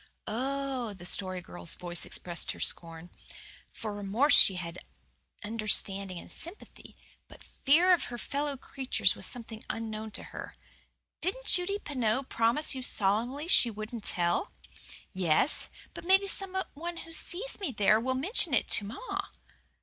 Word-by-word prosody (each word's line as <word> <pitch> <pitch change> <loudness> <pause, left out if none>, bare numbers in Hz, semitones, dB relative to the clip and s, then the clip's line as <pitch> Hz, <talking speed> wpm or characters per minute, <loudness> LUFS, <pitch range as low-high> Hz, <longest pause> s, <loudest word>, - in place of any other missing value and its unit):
"Oh!" 260 -1 -3
The 175 -2 -12
Story 185 0 +2
Girl's 85 - -8
voice 175 -1 -3
expressed 175 -1 -3
her - - -14
scorn. 165 +1 +4 0.6
For 215 -2 -6
remorse 210 +9 +2
she 190 - +7
had 175 -1 -6 0.6
understanding 200 -3 +1
and - - -10
sympathy; 345 +5 -9 0.3
but - - -16
fear 340 +7 +3
of 350 - +1
her 240 - -7
fellow 285 +3 -3
creatures 265 0 +1
was - - -1
something 225 -3 -3
unknown 220 -1 -5
to - - -3
her. - - -8 0.7
"Didn't - - -3
Judy 370 +3 +3
Pineau 260 - -2
promise 240 +5 +1
you 260 - -5
solemnly 240 +7 0
she 250 -8 +4
wouldn't 215 +1 -7
tell?" 175 - 0 0.6
"Yes; 185 - +1 0.2
but - - -9
maybe 385 +2 +4
some 390 -1 +1 0.2
one 340 +3 -6
who 330 - -12
sees 385 +10 +1
me 385 -9 -3
there 210 -1 +3
will 260 +3 -2
mention 315 - +1
it - - 0
to 205 - +4
ma." 240 - -5
235 Hz, 150 wpm, -29 LUFS, 200-295 Hz, 0.7 s, she